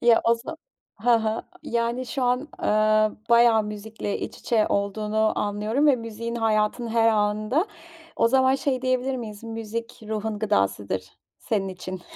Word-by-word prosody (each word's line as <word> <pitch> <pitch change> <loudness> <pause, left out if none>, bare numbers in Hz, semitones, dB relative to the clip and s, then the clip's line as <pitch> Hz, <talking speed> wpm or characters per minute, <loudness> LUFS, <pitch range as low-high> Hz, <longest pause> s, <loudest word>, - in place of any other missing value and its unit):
Ya 235 -1 +5
o 230 - +5
za 290 +8 -7 0.5
hı 245 - +3
hı. 220 0 -1 0.2
Yani, 235 +2 -1
şu 260 +2 -3
an, 250 0 +2 0.2
eee, 215 0 +3 0.2
bayağı 235 -2 +6
müzikle 210 0 -5
iç - - -6
içe 220 -3 +1
olduğunu 210 +2 0
anlıyorum 210 +8 0
ve 275 -3 +5
müziğin 230 0 -5
hayatının 225 +1 +1
her 225 0 +3
anında. 215 - +1 0.5
O 230 - +4
zaman 260 +1 +4
şey 270 -2 -1
diyebilir 255 0 0
miyiz, 215 -4 -7
müzik 225 +1 -6
ruhun 220 0 -2
gıdasıdır 100 - 0 0.3
senin 195 -3 -1
için? 185 0 -7
225 Hz, 150 wpm, -25 LUFS, 210-240 Hz, 0.5 s, bayağı